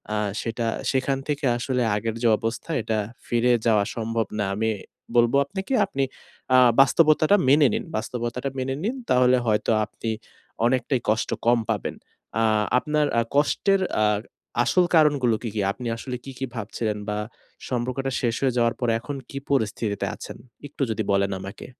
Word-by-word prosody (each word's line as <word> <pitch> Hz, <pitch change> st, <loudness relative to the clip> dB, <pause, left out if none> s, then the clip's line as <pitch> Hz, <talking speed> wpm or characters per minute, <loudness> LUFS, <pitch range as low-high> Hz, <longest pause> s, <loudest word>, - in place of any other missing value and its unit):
আ -, -, 0 dB, 0.2 s
সেটা 115 Hz, 0 st, -3 dB, 0.3 s
সেখান 135 Hz, +1 st, 0 dB
থেকে 145 Hz, -1 st, -1 dB
আসলে 125 Hz, +1 st, -1 dB
আগের 110 Hz, +1 st, -2 dB
যে -, -, +4 dB
অবস্থায় 115 Hz, +8 st, -3 dB
এটা 110 Hz, -1 st, 0 dB, 0.3 s
ফিরে 120 Hz, +1 st, +2 dB
যাওয়া 110 Hz, -3 st, +4 dB
সম্ভব 115 Hz, 0 st, -1 dB
না। 105 Hz, -, +1 dB
আমি 110 Hz, +2 st, 0 dB, 0.5 s
বলব 120 Hz, +1 st, +4 dB
আপনাকে 195 Hz, -, -4 dB
আপনি 135 Hz, -7 st, -2 dB, 0.5 s
আ -, -, +8 dB, 0.2 s
বাস্তবতাটা 155 Hz, +5 st, +5 dB
মেনে 145 Hz, 0 st, +6 dB
নিন -, -, -1 dB
বাস্তবতাটা 120 Hz, +4 st, -3 dB
মেনে 135 Hz, +1 st, -2 dB
নিন 230 Hz, +6 st, -1 dB
তাহলে 125 Hz, 0 st, +5 dB
হয়তো 105 Hz, 0 st, +2 dB
আপনি 105 Hz, +2 st, -6 dB, 0.6 s
অনেকটাই 125 Hz, +1 st, +1 dB
কষ্ট 110 Hz, +1 st, +1 dB, 0.2 s
কম 120 Hz, 0 st, +4 dB
পাবেন। 110 Hz, -3 st, -2 dB, 0.5 s
আ -, -, +3 dB, 0.3 s
আপনার 150 Hz, +3 st, +1 dB, 0.3 s
কষ্টের 190 Hz, +7 st, +2 dB, 0.2 s
আ -, -, +4 dB, 0.6 s
আসল 180 Hz, +7 st, +3 dB
কারণগুলো 145 Hz, -7 st, +4 dB
কি, 115 Hz, -, -2 dB
কি? 105 Hz, -, 0 dB
আপনি 120 Hz, +4 st, -6 dB
আসলে 125 Hz, +2 st, -5 dB
কী 135 Hz, -, -7 dB
কী 135 Hz, -, -1 dB
ভাবছিলেন 110 Hz, 0 st, -3 dB
বা 105 Hz, -, -1 dB, 0.5 s
সম্পর্কটা 130 Hz, +2 st, -2 dB
শেষ 120 Hz, -2 st, 0 dB
হয়ে 130 Hz, -2 st, +1 dB
যাওয়ার 120 Hz, -1 st, +2 dB
পর 120 Hz, -, 0 dB
এখন 145 Hz, +5 st, -6 dB
কি 140 Hz, -, -7 dB
পরিস্থিতিতে 110 Hz, -5 st, 0 dB
আছেন? -, -, -9 dB, 0.3 s
একটু 145 Hz, 0 st, -10 dB
যদি 110 Hz, 0 st, -1 dB
বলেন 100 Hz, 0 st, +2 dB
আমাকে। 95 Hz, +1 st, -8 dB
120 Hz, 160 wpm, -24 LUFS, 115-140 Hz, 0.6 s, আ